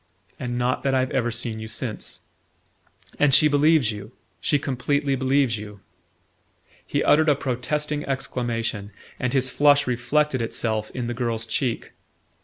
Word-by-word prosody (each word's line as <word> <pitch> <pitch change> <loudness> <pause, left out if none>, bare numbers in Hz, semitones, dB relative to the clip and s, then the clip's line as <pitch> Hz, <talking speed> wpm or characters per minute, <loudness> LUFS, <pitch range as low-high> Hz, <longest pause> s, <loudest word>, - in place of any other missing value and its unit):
"And 120 -1 -3
not 125 +1 0
that 135 -1 +1
I've 130 +1 +1
ever 125 -4 +1
seen 115 -1 -3
you 110 - -6
since..." - - -5 1.0
"And 145 -2 +5
she 155 - +7
believes 145 -4 +4
you 105 +2 -8 0.3
she 115 - +2
completely 140 +1 0
believes 130 -3 +1
you?" 105 -1 -9 1.1
He - - 0
uttered 155 +1 +4
a 145 - +5
protesting 145 +3 -2
exclamation, 115 -6 -3 0.3
and 125 - 0
his 130 -1 +1
flush 145 0 +4
reflected 130 +3 +1
itself 110 -1 -2
in 125 -2 -2
the 120 - -2
girl's 115 -2 -2
cheek. 120 +1 -2
125 Hz, 145 wpm, -24 LUFS, 115-140 Hz, 1.1 s, she